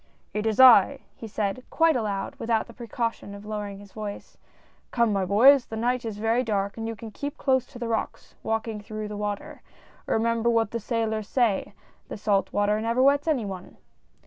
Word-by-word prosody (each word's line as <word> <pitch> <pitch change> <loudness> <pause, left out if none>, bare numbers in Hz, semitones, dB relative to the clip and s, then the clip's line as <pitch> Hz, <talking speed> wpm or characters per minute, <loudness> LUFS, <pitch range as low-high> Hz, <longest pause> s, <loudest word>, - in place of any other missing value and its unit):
" - - -40
It 210 +1 -1
is 220 +1 -1
I! 260 +1 +7
" - - -40
he 225 - -5
said, 210 +2 -2
quite 325 -2 +3
aloud, 210 -5 -2
without 225 -1 0
the 235 - -14
precaution 230 -3 -4
of 200 +1 -11
lowering 210 -2 -5
his 200 -1 -14
voice 210 -1 -7 0.2
— - - -32
" - - -38
come 235 -2 +2
on - - 0
my 195 -1 0
boys. 240 +7 +6
The 225 - -6
night 245 +2 0
is 220 -2 -4
very 225 +3 +1
dark, 200 -3 -1
and 225 0 -5
you 230 - -4
can 220 0 -9
keep 285 +6 -6
close 260 -2 +1
to - - -12
the 240 -1 -4
rocks, 225 -1 -3
walk 225 +1 -2
ing 215 -2 -5
through 215 0 -6
the 210 - -6
water. 205 0 -5 0.5
Remember 230 +1 +1
what 225 -2 +1
the 235 - -2
sailors 220 -2 -2
say, 230 -5 0 0.3
that - - -7
salt 200 -2 0
water 205 +1 +1
never 230 +3 +1
wets 280 +3 +3
any 275 -9 +1
one 190 -2 -8
225 Hz, 220 wpm, -26 LUFS, 205-235 Hz, 0.5 s, I